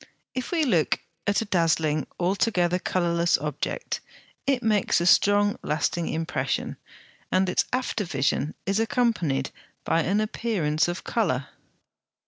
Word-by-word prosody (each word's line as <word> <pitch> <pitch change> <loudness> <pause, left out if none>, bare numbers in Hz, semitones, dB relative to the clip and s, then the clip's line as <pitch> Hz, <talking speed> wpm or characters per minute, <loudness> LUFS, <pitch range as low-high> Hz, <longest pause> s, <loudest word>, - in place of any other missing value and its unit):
If 255 -1 -4
we 335 -3 +2
look 180 - +2 0.3
at 200 +2 +2
a - - -2
dazzling, 160 -5 +1
altogether 180 -1 +1
colourless 170 -2 +1
object, 150 - -3 0.5
it 265 -3 +1
makes 210 -5 +2
a 170 - -1
strong 205 +3 +4
lasting 160 +2 -1
impression, 165 +2 -2 0.5
and 185 +1 +3
its 180 - +1
after 250 -4 -1
vision 140 -2 -1
is 195 +3 +1
accompanied 210 - 0 0.3
by 165 - +2
an 195 +5 +1
appearance 200 -9 0
of 175 +1 -4
colour. 140 - -1
180 Hz, 125 wpm, -26 LUFS, 160-215 Hz, 0.5 s, strong